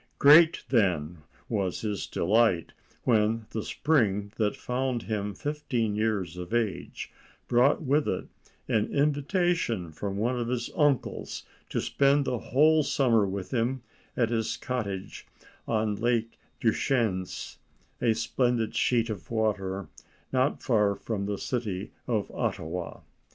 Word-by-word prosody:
Great, 155 +3 +7
then, 90 - +1 0.3
was 100 -5 -1
his 105 -3 -3
delight 100 -2 +2 0.3
when 110 -1 +2
the 110 - -2
spring 105 -9 +1
that 105 -2 +1
found 125 -1 -2
him 105 -2 -3
fifteen 125 -6 -2
years 105 -6 -1
of 90 +6 -4
age 110 -6 -2 0.4
brought 125 +6 +3
with 145 +2 +2
it 90 - -2 0.4
an 105 -1 +1
invitation 145 - +1
from 100 +5 -4
one 120 +4 0
of 120 - -2
his 120 -1 -2
uncles 145 -4 0 0.3
to - - -1
spend 140 +1 +2
the 125 - -1
whole 155 +7 +4
summer 115 -8 +2
with 95 -1 -5
him 125 +1 0 0.3
at 120 -2 +2
his 115 -2 -1
cottage 100 -7 -4 0.4
on 110 -2 +1
Lake 115 +1 -1 0.2
Deschenes, 110 -5 0 0.4
a 115 -2 +3
splendid 115 0 0
sheet 115 -2 +2
of 105 +4 -7
water 100 -5 -1 0.5
not 130 +3 +1
far 105 -5 +2
from 100 -1 -3
the 100 -1 -2
city 105 -6 -3 0.2
of 110 -4 -1
Ottawa. 85 +2 -3
115 Hz, 130 wpm, -28 LUFS, 100-125 Hz, 0.5 s, Great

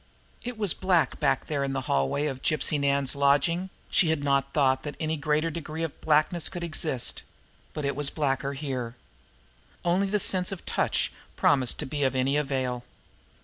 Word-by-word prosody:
It 245 -1 -5
was 205 -6 +3
black 180 -7 +1
back - - +1
there 145 -3 -1
in 135 0 -2
the 135 - -1
hallway 70 - 0
of 135 -3 -3
Gypsy 155 -1 +2
Nan's 140 -1 +1
lodging; 145 +6 +2 0.2
she 170 - +4
had 160 -3 0
not 140 -1 +1
thought 130 -3 +2
that 150 -1 -6
any 160 0 -1
greater 150 +2 0
degree 160 0 -5
of 165 - -5
blackness 155 +2 +2
could 175 -2 -6
exist; 155 -6 -1 0.5
but 150 - -4
it 140 - -1
was 145 0 +2
blacker 140 -2 -1
here. 130 -4 -4 0.9
Only 185 +3 +2
the 210 +2 +1
sense 185 -1 +3
of 195 - -7
touch - - 0 0.2
promised 130 -4 +3
to - - -3
be 145 +2 -4
of 135 -1 +1
any 130 +2 +1
avail. 130 -4 -1
145 Hz, 180 wpm, -27 LUFS, 135-160 Hz, 0.9 s, she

